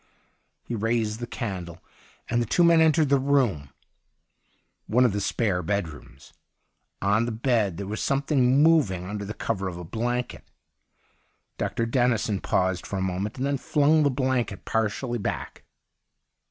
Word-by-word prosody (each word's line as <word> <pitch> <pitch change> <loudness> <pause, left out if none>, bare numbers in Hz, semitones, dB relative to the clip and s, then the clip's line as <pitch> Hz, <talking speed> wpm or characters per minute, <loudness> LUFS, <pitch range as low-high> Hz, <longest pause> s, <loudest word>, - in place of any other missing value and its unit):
He - - -6
raised 115 -1 -1
the 120 - -5
candle 90 -8 -5 0.5
and 120 0 +1
the 120 - -2
two 175 - +3
men 170 -1 +6
entered 160 -2 +3
the 140 -1 +4
room 130 - +1 0.6
— - - -44
one 125 +4 +4
of 115 - +2
the 105 - -2
spare 100 -3 0
bedrooms. 80 -7 -5 0.7
On 105 +3 +2
the 120 - -3
bed 110 -6 0
there 100 - -4
was 105 +3 -4
something 135 -1 +2
moving 140 - +3
under 100 +1 -5
cover 95 -2 -3
of 90 -2 -5
a 90 - -7
blanket. 120 +7 -3 1.2
Dr. 115 - -1
Dennison 115 -4 +1
paused 95 -1 0
for 100 - -4
a - - -2
moment 95 +4 -3
and 130 - -1
then 140 -1 -1
flung 150 +2 +3
the 145 - +3
blanket 130 -6 -1
partially 110 +3 -1
back. 100 - -5
115 Hz, 155 wpm, -25 LUFS, 100-130 Hz, 1.2 s, men